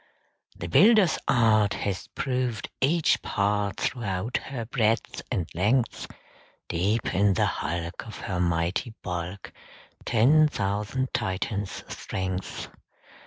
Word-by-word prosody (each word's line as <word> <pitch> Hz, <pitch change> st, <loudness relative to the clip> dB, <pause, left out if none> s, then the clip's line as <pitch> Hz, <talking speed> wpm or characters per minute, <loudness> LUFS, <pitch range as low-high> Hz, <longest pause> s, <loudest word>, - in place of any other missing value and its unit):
"The 85 Hz, -, -6 dB
builder's 205 Hz, -, +5 dB
art 110 Hz, -4 st, +4 dB
Has 95 Hz, -4 st, -3 dB
proved 125 Hz, -4 st, -2 dB
each 160 Hz, +4 st, +3 dB
part 100 Hz, 0 st, 0 dB
Throughout 110 Hz, -1 st, -1 dB
her 130 Hz, -4 st, -5 dB
breadth 115 Hz, -1 st, 0 dB
and 95 Hz, -10 st, -1 dB
length; 110 Hz, +8 st, +1 dB, 0.6 s
Deep 100 Hz, +7 st, 0 dB
in 100 Hz, 0 st, +3 dB
the -, -, +3 dB
hulk, 85 Hz, +5 st, -3 dB
Of 110 Hz, -, -8 dB
her 90 Hz, -3 st, -3 dB
mighty 85 Hz, +7 st, 0 dB
bulk, 90 Hz, +1 st, -5 dB, 0.5 s
Ten 140 Hz, +7 st, +5 dB
thousand 105 Hz, +2 st, -2 dB
Titans' 100 Hz, -1 st, -2 dB
strength." 95 Hz, 0 st, -4 dB
105 Hz, 110 wpm, -26 LUFS, 95-120 Hz, 0.6 s, builder's